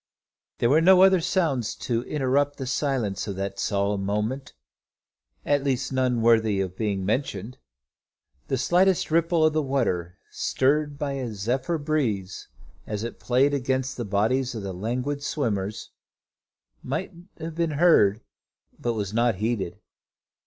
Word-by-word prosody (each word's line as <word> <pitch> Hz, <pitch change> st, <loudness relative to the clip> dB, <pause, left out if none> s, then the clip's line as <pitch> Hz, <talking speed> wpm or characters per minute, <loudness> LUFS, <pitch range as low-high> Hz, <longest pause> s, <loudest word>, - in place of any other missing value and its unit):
There 120 Hz, -, +2 dB
were 155 Hz, +3 st, +5 dB
no 185 Hz, +2 st, +7 dB
other 190 Hz, -2 st, +5 dB
sounds 160 Hz, -, 0 dB
to 115 Hz, -2 st, -2 dB
interrupt 145 Hz, 0 st, 0 dB
the 135 Hz, -, -4 dB
silence 125 Hz, -7 st, -1 dB
of 100 Hz, -, -4 dB
that 100 Hz, 0 st, -4 dB
solemn 100 Hz, -1 st, 0 dB
moment, 105 Hz, +7 st, -2 dB, 0.9 s
at 145 Hz, -1 st, +2 dB
least 135 Hz, -1 st, -1 dB
none 125 Hz, -3 st, +1 dB
worthy 110 Hz, -3 st, +4 dB
of 95 Hz, -1 st, -2 dB
being 100 Hz, -3 st, -2 dB
mentioned. 115 Hz, +1 st, -2 dB, 0.9 s
The 135 Hz, -, 0 dB
slightest 180 Hz, +6 st, +2 dB
ripple 165 Hz, 0 st, +3 dB
of 155 Hz, -, +3 dB
the 155 Hz, -, +2 dB
water, 105 Hz, -, -1 dB
stirred 145 Hz, +2 st, 0 dB
by 140 Hz, -1 st, -2 dB
a 130 Hz, -4 st, -3 dB
zephyr 130 Hz, -, -1 dB
breeze, 125 Hz, -, -2 dB, 0.4 s
as 105 Hz, 0 st, -3 dB
it 115 Hz, -, -6 dB
played 130 Hz, +3 st, +2 dB
against 130 Hz, -1 st, -1 dB
the 120 Hz, -, -4 dB
bodies 115 Hz, +6 st, 0 dB
of 110 Hz, -, -5 dB
the 95 Hz, -1 st, -4 dB
languid 125 Hz, +9 st, -3 dB
swimmers, 110 Hz, -9 st, -2 dB, 0.9 s
might 160 Hz, +9 st, -4 dB, 0.2 s
have 165 Hz, 0 st, -6 dB
been 165 Hz, -1 st, -1 dB
heard, 115 Hz, -, +5 dB, 0.6 s
but 120 Hz, -, -1 dB
was 105 Hz, -2 st, -3 dB
not 115 Hz, -1 st, +2 dB
heeded. 105 Hz, -3 st, -2 dB
125 Hz, 145 wpm, -25 LUFS, 105-145 Hz, 0.9 s, no